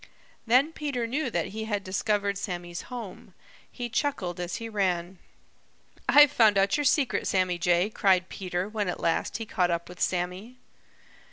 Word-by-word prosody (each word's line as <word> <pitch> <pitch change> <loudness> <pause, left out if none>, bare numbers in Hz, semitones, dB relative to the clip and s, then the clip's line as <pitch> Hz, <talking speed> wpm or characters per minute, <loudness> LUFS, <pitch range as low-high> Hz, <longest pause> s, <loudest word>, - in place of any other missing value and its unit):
Then 265 +7 +4
Peter 280 -7 -2
knew 265 +4 -1
that 175 -7 -2
he 220 +2 -5
had 205 -2 -2
discovered 200 +1 0
Sammy's 175 -3 -5
home. 235 -6 -8 0.4
He 245 -1 -5
chuckled 205 - -2
as 175 0 -3
he 230 - -5
ran. 185 -4 -1 0.9
"I've 290 -1 +8
found 220 -7 +4
out 195 0 +3
your 295 - -1
secret, 275 -1 +2
Sammy 185 -2 +1
Jay!" 175 +4 +2
cried 185 -3 +2
Peter 180 -1 -3
when 210 -3 -2
at - - -4
last 165 - 0
he 225 - -5
caught 180 -4 0
up 170 0 -2
with 180 0 -11
Sammy. 185 +7 -2
200 Hz, 165 wpm, -27 LUFS, 180-230 Hz, 0.9 s, I've